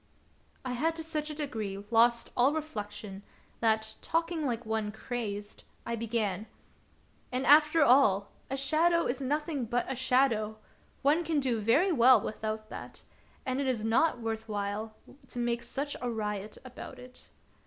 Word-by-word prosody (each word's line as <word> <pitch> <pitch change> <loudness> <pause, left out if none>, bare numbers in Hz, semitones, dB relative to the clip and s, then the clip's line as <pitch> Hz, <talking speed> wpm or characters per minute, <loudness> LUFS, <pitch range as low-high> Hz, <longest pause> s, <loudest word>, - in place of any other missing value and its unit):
" - - -35
I 255 - -2
had 315 +7 0
to 325 - -4
such 310 -1 -3
a 300 - -5
degree 220 -10 -4
lost 235 +1 +4
all 255 +4 +4
reflection 210 -9 -5 0.4
that, 220 -1 +1
talking 330 -2 -1
like 240 -1 -2
one 220 -1 -1
crazed, 210 -3 -5 0.2
I 235 - -2
began: 220 -3 -2 0.4
" - - -35
And, 255 +1 -1
after 300 +2 +6
all, 215 -7 +5 0.2
a 270 - -2
shadow 330 +5 +3
is 250 +2 -2
nothing 295 0 -1
but 240 +2 0
a 265 - -2
shadow; 245 -4 +2 0.5
one 300 +5 +3
can 320 -2 +1
do 250 -5 0
very 285 - +3
well 255 -4 +7
without 215 +1 -4
that, - - -9 0.4
and 260 +1 -1
it 275 - -1
is 235 -4 0
not 240 +5 +3
worth 225 -1 -4
while 205 +1 -3 0.3
to - - -9
make 240 -1 0
such 285 +3 -3
a 245 - -1
riot 210 -2 -4
about 255 +1 -9
it." 250 0 -14
245 Hz, 165 wpm, -30 LUFS, 220-280 Hz, 0.5 s, well